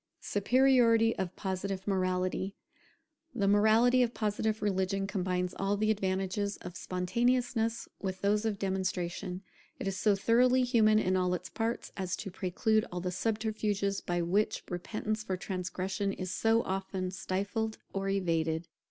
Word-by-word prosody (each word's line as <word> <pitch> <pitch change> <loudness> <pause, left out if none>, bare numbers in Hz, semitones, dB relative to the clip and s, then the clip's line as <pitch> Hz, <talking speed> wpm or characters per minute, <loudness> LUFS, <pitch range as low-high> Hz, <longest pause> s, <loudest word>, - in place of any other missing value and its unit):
[Superiority 230 0 +4
of 185 -1 -3
Positive 190 0 -3
morality] 185 0 0 0.8
The 200 -4 +1
morality 220 +5 +5
of 240 -1 +1
Positive 215 0 0
religion 195 -1 0
combines 180 -2 -1
all 195 +1 +1
the 215 +1 +2
advantages 195 0 -1
of 180 -1 -9
spontaneousness 235 +5 0
with 190 -1 -3
those 210 +1 +2
of 220 -2 -1
demonstration. 185 -1 -2 0.3
It - - -4
is 195 - -1
so 210 -2 +4
thoroughly 250 +5 +4
human 225 -4 +4
in 185 -3 +2
all 180 -1 +2
its 180 +1 -7
parts, 230 +1 -3
as 185 -2 -2
to 195 - -6
preclude 205 +4 +1
all 180 - -3
the 180 +1 -2
subterfuges 210 -1 -1
by 175 -1 -1
which 195 +5 +1
repentance 215 +4 -3
for 190 -4 -2
transgression 190 +1 -3
is 185 -1 -4
so 225 +1 +3
often 190 -1 -3
stifled 200 +4 -2 0.2
or 195 0 -1
evaded. 165 -4 0
195 Hz, 145 wpm, -31 LUFS, 185-220 Hz, 0.8 s, morality